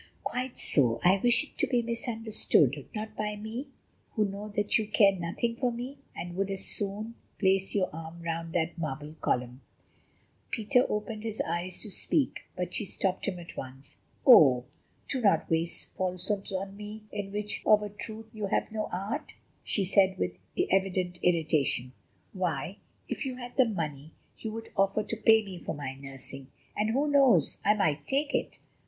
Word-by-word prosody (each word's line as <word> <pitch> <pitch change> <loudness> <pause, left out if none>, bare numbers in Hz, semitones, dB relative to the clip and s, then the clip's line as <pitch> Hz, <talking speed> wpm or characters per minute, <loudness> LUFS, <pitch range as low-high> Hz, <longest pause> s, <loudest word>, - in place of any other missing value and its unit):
"Quite 255 0 -3
so, 120 -5 +4
I 185 +2 +6
wish 240 +1 +4
it 295 - -16
to - - +3
be 245 -2 +2
misunderstood: 220 - +1
not 215 0 -5
by 210 0 -2
me, 220 +6 -5 0.5
who 215 -3 +2
know 200 +1 -5
that 205 +1 +3
you 215 - -2
care 205 -1 +6
nothing 185 +7 -2
for 250 -1 +1
me 250 +4 -6 0.2
and 175 0 -6
would 195 +1 0
as 195 -1 -2
soon 210 +2 -2 0.2
place 190 0 +2
your 190 -2 +3
arm 165 +1 -8
round 165 0 -3
that 170 0 0
marble 150 -1 -4
column." 125 +1 -1 0.9
Peter 250 +3 +2
opened 210 +1 -3
his 220 -1 -4
lips 170 +2 -3
to 210 - -5
speak, 280 +7 +1 0.2
but 180 - -3
she - - 0
stopped 190 -1 -1
him 190 -2 -1
at 170 -1 -10
once. 135 +1 -9 0.3
"Oh! 135 - +8 0.4
do 260 - -1
not 200 -4 +3
waste 165 +1 -1
falsehoods 185 +2 -1
on 195 +1 -3
me, 210 +1 -8
in 200 -1 -4
which 210 0 -2
of 210 -1 +6
a 210 - -4
truth 220 +2 -8
you 215 -2 -3
have - - 0
no 215 -1 -2
art," 205 +12 -4 0.3
she 200 - +1
said 190 0 +4
with 90 0 -1 0.4
evident 185 -2 +1
irritation. 155 -7 +1 0.4
"Why, 180 0 -2 0.3
if - - -3
you 265 -2 -3
had 245 -1 -8
the 260 - +6
money, 155 - -4 0.3
you 220 - -4
would 225 +1 -7
offer 195 +2 +2
to 220 - -3
pay 220 0 +5
me 185 -3 -7
for - - -4
my 140 -2 -4
nursing, 135 0 -8 0.3
and 215 +1 +1
who 275 +6 +2
knows, 270 - +4
I 210 +1 +5
might 155 -8 0
take 285 +2 0
it! - - -1
195 Hz, 175 wpm, -29 LUFS, 170-220 Hz, 0.9 s, Oh